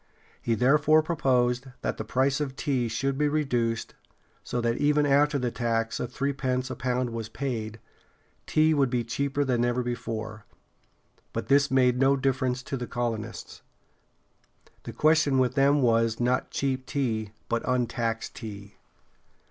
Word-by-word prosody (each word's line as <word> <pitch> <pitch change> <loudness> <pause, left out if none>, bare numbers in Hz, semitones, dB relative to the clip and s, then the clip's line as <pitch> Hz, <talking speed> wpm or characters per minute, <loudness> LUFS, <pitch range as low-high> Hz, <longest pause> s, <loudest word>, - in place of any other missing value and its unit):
He 115 - 0
therefore 150 +5 +4
proposed 130 -5 +1 0.2
that - - -2
the - - -3
price 130 +5 +1
of 135 -3 -3
tea 135 -5 0
should 135 +5 -2
be 150 - +3
reduced, 125 -7 -1 0.5
so 125 - -3
that 115 0 0
even 150 0 +3
after 145 +1 +3
the 125 -3 -1
tax 115 -1 -1
of 125 - -4
threepence 130 -1 -2
a - - -4
pound 125 -1 -1
was 115 -1 -5
paid, 115 -4 -4 0.7
tea 155 +1 +3
would 140 -3 +2
be 120 -1 0
cheaper 140 +4 -1
than 125 -3 +1
ever 120 +1 0
before. 110 -3 -5 0.9
But - - -4
this 140 +1 +4
made 125 -2 +3
no 135 +1 +4
difference 130 -1 0
to 135 - -4
the 125 -1 -5
colonists. 115 -2 -4 1.2
The - - -5
question 155 -3 +3
with 130 -1 +2
them 140 +1 +3
was 115 -1 +2
not 125 +1 +1
cheap 130 -1 -2
tea, 110 -7 -2
but 115 0 0
untaxed 120 -2 -1
tea. 100 -3 -9
125 Hz, 150 wpm, -27 LUFS, 115-140 Hz, 1.2 s, therefore